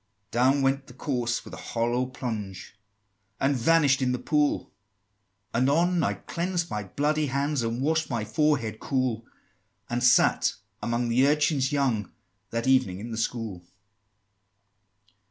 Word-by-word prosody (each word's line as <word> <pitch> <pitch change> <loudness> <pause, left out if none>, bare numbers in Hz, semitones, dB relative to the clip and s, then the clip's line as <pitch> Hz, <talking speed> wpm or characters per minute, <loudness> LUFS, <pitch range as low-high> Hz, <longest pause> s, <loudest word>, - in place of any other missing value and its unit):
XXII. 100 +1 -48
"Down 130 +4 +3
went 135 0 +1
the 125 - -13
corse 120 -3 -2
with - - -11
a - - -6
hollow 120 +2 -1
plunge, 110 -8 -6 0.6
And 135 +1 +2
vanish'd 140 +1 +3
in 125 -1 +1
the - - 0
pool; 145 +3 0 0.8
Anon 160 +8 +2
I - - 0
cleansed 175 0 -3
my 105 -1 -3
bloody 150 +9 0
hands, 140 +1 0
And 115 +2 -2
wash'd 160 +2 +1
my 115 -5 -2
forehead 115 -2 0
cool, 125 -4 -1 0.6
And 120 +1 -1
sat 125 - +4 0.3
among 120 0 -1
the 125 +4 +4
urchins 150 -2 +2
young, 130 -8 0 0.4
That 115 0 -2
evening 130 -9 +2
in 115 +3 -7
the - - -3
school." 115 -5 -3
130 Hz, 140 wpm, -27 LUFS, 115-145 Hz, 0.8 s, sat